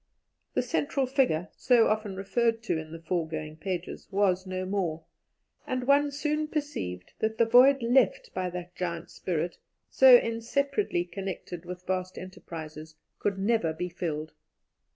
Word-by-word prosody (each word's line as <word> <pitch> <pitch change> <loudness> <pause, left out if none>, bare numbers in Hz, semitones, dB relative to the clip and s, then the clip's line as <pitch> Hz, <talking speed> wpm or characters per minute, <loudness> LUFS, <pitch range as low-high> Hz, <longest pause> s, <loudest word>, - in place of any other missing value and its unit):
The - - +2
central 275 -1 0
figure, 255 - +1
so 240 -3 +4
often 215 -2 0
referred 225 +4 0
to 185 -7 0
in 155 0 -8
the 165 0 -9
foregoing 160 -2 -3
pages, 180 0 -5
was 190 -2 +1
no 185 0 -3
more, 180 -5 -2 0.6
and 255 -1 -2
one 285 +2 +4
soon 300 +2 -1
perceived 285 - -4
that 220 0 -1
the 230 - +5
void 250 +3 +6
left 240 -3 +2
by 185 0 -1
that 180 0 -7
giant 170 -2 -4
spirit, 170 -1 -3 0.3
so 260 -2 +9
inseparably 230 - 0
connected 180 -2 -6
with 180 0 -8
vast 185 -1 -2
enterprises, 160 -4 -8 0.2
could 200 -1 0
never 195 -5 +1
be 180 +3 -4
filled. 160 -3 -4
190 Hz, 145 wpm, -28 LUFS, 170-240 Hz, 0.6 s, so